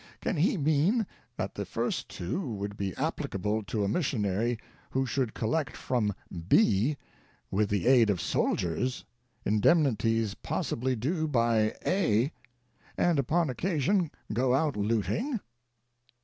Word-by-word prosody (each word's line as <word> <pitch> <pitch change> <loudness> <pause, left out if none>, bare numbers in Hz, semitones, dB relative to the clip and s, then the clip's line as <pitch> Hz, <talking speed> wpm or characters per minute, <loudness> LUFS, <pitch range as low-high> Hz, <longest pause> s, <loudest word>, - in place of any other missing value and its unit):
Can - - -1
he 175 +6 +2
mean 160 - +2 0.3
that - - -3
the - - -3
first - - -2
two 90 - -3
would 100 0 -4
be 100 -3 -3
applicable 105 +3 -1
to 105 +1 -1
a - - +1
missionary 110 - 0 0.3
who 130 0 0
should 130 -2 -1
collect 145 +7 -1
from 105 -6 0 0.3
B, 115 +10 +4 0.5
with 100 +1 +1
the 100 -4 0
"aid 120 -4 +6
of 95 -4 +1
soldiers," 85 +8 -1 0.4
indemnities 115 - +3
pos - - -3
sibly 130 +2 0
due 155 +8 -1
by 115 -5 +2
A, 140 - +2 0.7
and 170 -4 +3
upon 155 +3 +1
occasion 170 - +1 0.2
go 125 +3 +2
out 145 +1 +1
looting? 115 - 0
120 Hz, 130 wpm, -29 LUFS, 105-155 Hz, 0.7 s, aid